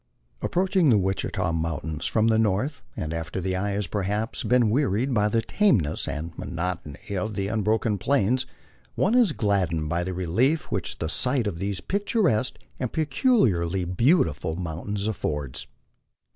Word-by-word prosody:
Approaching 185 -3 +2
the 115 - +6
Wichita 95 -2 0
mountains 80 -1 -2
from 110 -1 +2
the 110 -1 +3
north, 115 +7 0 0.2
and 80 +1 -3
after 80 +2 -4
the 95 0 -1
eye 100 +2 -1
has 100 0 -1
perhaps 105 +4 -2
been 120 -3 +3
wearied 130 0 +1
by 105 -2 +3
the 115 +2 +1
tameness 105 - +1
and 80 +2 -4
monotony 85 0 -4
of 105 +3 -2
the 100 +1 -2
un 110 -1 0
broken 110 0 +1
Plains, 130 +1 +1 0.5
one 195 - +2
is 240 -7 +5
gladdened 90 - 0
by 85 +2 0
the 90 0 -4
relief 115 - +1
which - - -2
the 80 - -2
sight 125 - +1
of 95 -5 -3
these 100 -1 -2
pictur 205 +1 +1
esque 125 +4 0 0.2
and 125 - -2
peculiarly 120 - +2
beautiful 90 - +2
mountains 95 +4 -4
affords. 75 - -3
100 Hz, 160 wpm, -25 LUFS, 85-125 Hz, 0.5 s, the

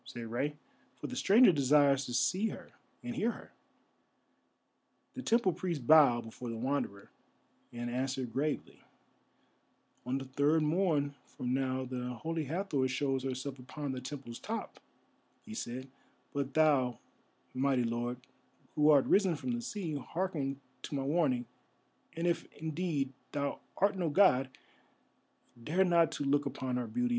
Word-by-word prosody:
said 120 - -7
Rei, 140 +6 -1 0.5
"for - - -4
the - - -6
Stranger 220 +2 +6
desires 140 -2 +4
to 120 - -5
see 180 - +2
her - - -9 0.3
and 245 0 -4
hear 230 +2 +1
her." - - -12 1.6
The 260 - -4
temple 230 -7 +3
priest 165 -9 -3
bowed 140 -5 +6
before 120 +2 -7
the 115 - -4
Wanderer, 120 -5 -2 0.6
and 120 0 -4
answered 130 -1 -2
gravely: 145 +4 -2 1.3
"On 130 +2 0
the 135 - -5
third 145 +4 +2
morn 155 -3 +1 0.2
from 125 0 -1
now 130 0 0
the 125 -1 -4
Holy 160 -1 -2
Hathor 155 -3 0
shows 135 0 -1
herself 130 +1 -4
upon 140 +3 -5
the 130 -1 -4
temple's 130 -3 -7
top," 225 +1 -5 0.7
he 220 - -8
said; 130 - -5 0.5
"but 140 -1 -3
thou, 140 -6 +3 0.6
mighty 130 -1 +2
lord, 120 +1 -2 0.6
who 150 0 +4
art 145 -3 +6
risen 190 -4 +3
from 250 - -3
the 240 0 -2
sea, 200 -9 -4
hearken 145 -2 -2 0.2
to - - -5
my 135 - -1
warning, 135 -4 +1 0.7
and 165 - -1
if, 170 -1 0
indeed, 155 -4 -2 0.2
thou 140 -1 -2 0.2
art 200 +1 +3
no 175 -4 0
god, 145 -7 +4 1.1
dare 180 +8 +2
not 170 -2 +4
to - - -3
look 145 +1 +2
upon 130 -2 -3
her 125 -2 -2
beauty. 245 - 0
140 Hz, 150 wpm, -32 LUFS, 130-165 Hz, 1.6 s, Stranger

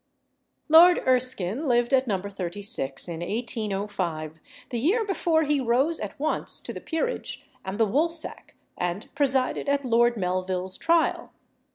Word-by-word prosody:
Lord 335 +3 +8
Erskine 255 - +1
lived 240 +1 +2
at 265 -1 +3
No. 195 -4 0
36, 185 -7 -1
in 165 -2 -5
1805, 195 -6 -3 0.3
the 240 - -1
year 405 - +2
before 335 -5 +1
he 295 -2 +1
rose 260 +7 +1
at 210 +3 -6
once 310 +2 -1
to - - -6
the - - -8
peerage 360 +10 -3 0.2
and 190 +3 -5
the 225 - +5
woolsack, 315 +9 -2 0.2
and 180 +4 -4
presided 270 -1 +1
at 280 -1 0
Lord 240 0 +3
Melville's 185 0 -2
trial. 330 0 +1
240 Hz, 140 wpm, -26 LUFS, 190-290 Hz, 0.3 s, Lord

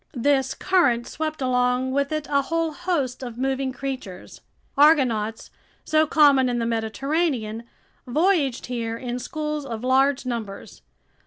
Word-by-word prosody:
This 265 +1 +1
current 300 -11 +2
swept 310 -2 -4
along 250 0 +1
with 280 +2 0
it 310 -1 -2
a 280 -1 +2
whole 330 +3 -1
host 305 -7 -2
of 240 -3 -7
moving 265 +1 -1
creatures. 255 -8 -7 0.3
Argonauts, 255 -8 +3 0.3
so 310 0 +3
common 280 -4 +5
in 245 - -1
the 230 - -1
Mediterranean, 230 +1 -1 0.4
voyaged 300 -2 +1
here 230 -2 -3
in 245 0 -4
schools 300 +3 -4
of 235 -4 -6
large 265 +1 +2
numbers. 225 -5 -6
265 Hz, 135 wpm, -23 LUFS, 240-300 Hz, 0.4 s, common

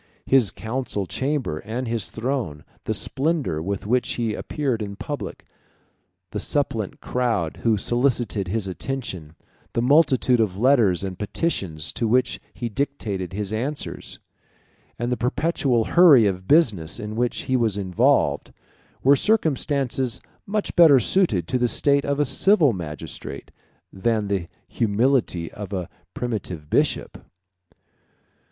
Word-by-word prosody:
His 130 -7 +4
council 110 -1 -3
chamber 130 - -2
and 120 +7 -4
his 115 -3 -2
throne, 115 - -3 0.2
the - - 0
splendor 140 - -1
with 100 +3 -3
which 125 +4 +1
he 115 -3 -1
appeared 130 -2 -2
in 100 -1 -5
public, 115 0 -6 0.9
the - - -3
suppliant - - -2
crowd 115 -10 -1
who 115 -2 +1
solicited 120 -3 0
his 105 +2 -1
attention, 95 - -5 0.4
the 115 - +1
multitude 130 -3 +4
of 100 -4 0
letters 110 -7 +3
and 95 -2 -5
petitions 95 - -2
to 115 - -1
which 125 +2 +1
he 120 - -5
dictated 105 -7 -3
his 105 +1 -3
answers, 135 +7 -4 0.8
and 120 +1 -2
the 125 - 0
perpetual 125 -2 +1
hurry 160 -10 +7
of 95 -2 -2
business 110 - +3
in 105 0 -5
which 120 +1 0
he 130 - -1
was 115 -5 +1
involved, 95 -3 +1 0.5
were 140 +2 +6
circumstances 140 - 0 0.3
much 210 +1 -2
better 160 -6 +8
suited 115 - +2
to 125 - 0
the 120 - +3
state 140 +5 +2
of 140 0 -1
a 145 - +3
civil 150 - +4
magistrate, 75 -6 -7 0.4
127 - - -37
than 105 +2 0
to 95 -4 -1
the - - -40 0.2
humility 110 -5 +1
of 105 -2 -8
a 90 -3 -3 0.3
primitive 95 -10 -4
bishop. - - 0
115 Hz, 135 wpm, -23 LUFS, 100-135 Hz, 0.9 s, better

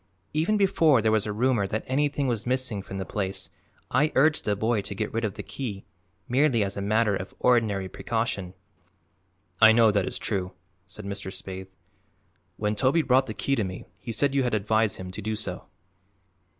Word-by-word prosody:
Even 165 +8 +2
before 165 - +4
there 110 0 +2
was 110 -1 +2
a - - -1
rumor 115 -1 +1
that 110 +3 -2
anything 145 +1 0
was 120 -3 -1
missing 130 -5 -1
from 95 0 -7
the 95 - -3
place 95 -1 -4 0.4
I 150 +5 +3
urged 155 +3 +3
the 105 - +1
boy 110 +1 +1
to 100 - -6
get 105 +1 -3
rid 115 +1 -1
of 105 -3 -2
the - - -6
key 105 -8 -6 0.4
merely 130 -3 +3
as 100 -1 -3
a 100 - -3
matter 105 +1 +2
of 95 0 -6
ordinary 110 -6 +2
precaution." 100 -3 -3 1.1
"I 110 0 +9
know 115 -1 +5
that 100 -2 +1
is - - -3
true," 95 -4 -3 0.3
said 105 - -8
Mr. 100 -1 -5
Spaythe. 95 0 -7 0.9
"When 105 0 0
Toby 135 +8 +3
brought 130 0 +3
the 110 - -5
key 135 +6 0
to 115 - 0
me 90 -1 -6
he 95 - -6
said 135 +5 +1
you 140 - +3
had 125 -3 +1
advised 110 +1 +1
him 90 0 -7
to 100 - -6
do 110 +1 -2
so." 105 - -5
110 Hz, 195 wpm, -26 LUFS, 100-130 Hz, 1.1 s, I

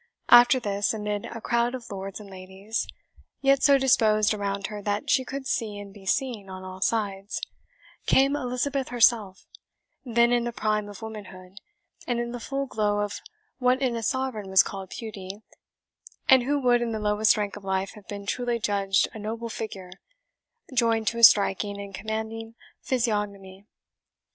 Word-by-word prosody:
After 245 +2 +8
this, 205 -1 -1
amid 210 -1 -3
a 230 - -7
crowd 235 +2 0
of 240 -4 -9
lords 195 0 -6
and 210 - -11
ladies, 190 +3 -5 0.5
yet 275 0 +3
so 280 -1 +6
disposed 215 -5 +3
around 200 -1 -3
her 210 0 -5
that 205 +1 -1
she 260 - +3
could 270 +1 -6
see 225 -6 -2
and 200 -1 -9
be 195 -2 -14
seen 230 -5 -1
on 185 0 -8
all 185 0 -9
sides, 200 -2 -1 0.7
came 275 +2 +4
Elizabeth 265 +1 -2
herself, 230 -5 +2 0.6
then 235 -1 +3
in 240 -1 +2
the 240 - -2
prime 215 -2 -1
of 205 +1 -10
womanhood, 195 -3 -9 0.5
and 240 -1 0
in 240 0 -3
the 245 - -5
full 275 +4 -3
glow 210 -4 0
of 205 0 -4 0.4
what 250 0 +3
in 255 -3 0
a 230 - -3
Sovereign 255 -5 -2
was 190 -3 +6
called 195 -2 -7
beauty, 205 -2 -8 0.8
and 260 -2 +7
who 285 +4 0
would 245 -2 +3
in 235 -1 -1
the 220 - -2
lowest 210 0 +3
rank 205 -1 -2
of 210 - -10
life 190 0 -1
have 210 -3 -15
been 200 -1 -7
truly 240 +3 -1
judged 200 -3 +1
a 220 - -8
noble 225 +2 -4
figure, 195 -5 -6 0.8
joined 230 -3 +2
to 235 - -5
a - - -3
striking 200 -1 +5
and 200 -1 -8
commanding 220 +2 -5 0.3
physiognomy. 205 -5 -2
215 Hz, 170 wpm, -26 LUFS, 200-240 Hz, 0.8 s, After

